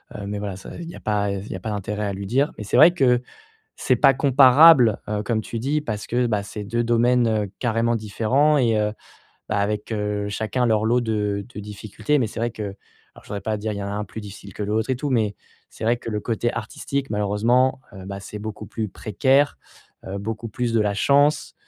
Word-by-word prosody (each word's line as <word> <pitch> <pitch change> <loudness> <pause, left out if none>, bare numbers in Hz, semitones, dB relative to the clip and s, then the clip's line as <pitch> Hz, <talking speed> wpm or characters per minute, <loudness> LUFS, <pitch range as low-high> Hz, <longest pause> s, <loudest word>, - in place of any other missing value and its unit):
heu, 100 - -6
mais 105 0 -3
voilà, 100 -2 -4
ça, 95 - -10
il 170 - -7
y - - -9
a - - -10
pas, 105 -1 0
heu, - - -2
s 95 - -9
il - - -9
y - - -4
a - - -10
pas 110 - -4
d'intérêt 105 +1 -3
à 100 - -2
lui 100 0 -6
dire, 135 +7 +1
mais - - -4
c'est 105 - 0
vrai 160 +6 +8
que 125 -7 +3 0.6
c'est 130 - +1
pas 135 - +5
comparable, 135 -2 +6
heu, 105 0 -1
comme 110 +1 -1
tu 115 - -5
dis, 140 +6 0
parce 110 -7 -4
que 125 +1 +1
bah 105 -3 0
c'est 105 0 -7
2 120 +3 -1
domaines, 120 +1 +3
heu, 105 -3 -1
carrément 115 -1 +1
différents 115 +8 +2
et 115 -4 +2
heu, 105 0 0 0.6
bah, 105 - -1
avec, 105 +2 -2
heu, 105 -1 -2
chacun 110 +4 -1
leur 110 -2 +2
lot 120 +3 +3
de 105 -3 -1
de - - -7
difficultés, 105 +6 -2
mais 115 - 0
c'est - - -8
vrai 120 +1 0
que 110 - -6 0.5
alors - - -15
je - - -17
voudrais 100 - -3
pas 110 +1 -1
dire, 110 +1 -3
il 100 - -5
y - - -4
a 100 0 -4
un 105 +1 -3
plus 110 +2 -8
difficile 100 -2 -11
que - - -5
l'autre 110 +4 -1
et - - +2
tout, 145 +3 -3
mais 110 -5 +1 0.4
c'est - - -8
vrai 120 +2 +3
que - - -8
le 105 -1 -2
côté 120 +2 -1
artistique 135 +4 -4
malheureusement, 115 +6 +2
heu, 95 -2 -10
bah, 100 0 -6
c'est 105 +2 -8
beaucoup 105 0 -6
plus 110 -2 -4
précaire. 130 +9 +1 0.5
Heu, 95 +1 -5
beaucoup 110 +3 -5
plus 120 +2 -2
de 115 - +3
la 105 -1 +1
chance, 145 +7 +2
110 Hz, 245 wpm, -23 LUFS, 105-125 Hz, 0.6 s, vrai